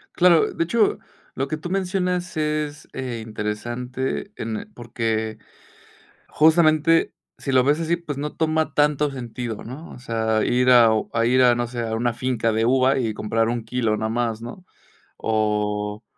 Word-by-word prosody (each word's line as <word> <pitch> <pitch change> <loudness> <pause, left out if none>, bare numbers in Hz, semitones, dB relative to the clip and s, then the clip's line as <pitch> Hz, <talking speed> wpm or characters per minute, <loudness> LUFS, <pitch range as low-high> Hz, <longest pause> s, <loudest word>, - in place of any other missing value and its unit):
Claro, 175 -2 +5
de - - 0
hecho, 215 +5 +1 0.4
lo 135 - -1
que 155 - -3
tú 165 +3 -7
mencionas 180 -1 -1
es, 150 0 -2
eh, 125 -4 -4
interesante 120 - -4
en 110 -1 -5
porque 110 -2 -3 0.9
justamente 160 0 +4 0.2
si 135 - -4
lo 130 -1 +4
ves 145 +4 +2
así, 165 +1 0
pues 150 -5 -6
no 150 +1 -4
toma 160 0 0
tanto 150 -1 +2
sentido, 120 -3 -6
¿no? 135 +8 -9
O - - -11
sea, 110 -2 0
ir 125 +1 +3
a 120 -2 +7 0.2
a 115 0 +2
ir 125 +2 +4
a, 120 -1 +6
no 120 0 -1
sé, 120 -1 -5
a 110 -1 -2
una 120 +1 0
finca 120 -2 -1
de 110 +1 +1
uva, 130 +2 +3
y 115 -4 -1
comprar 110 +2 0
1 120 -1 -2
kilo 115 -2 0
no 110 +1 -2
más, 115 -1 -1
¿no? 125 +10 -9 0.5
O 105 -1 -1
125 Hz, 165 wpm, -23 LUFS, 115-150 Hz, 0.9 s, a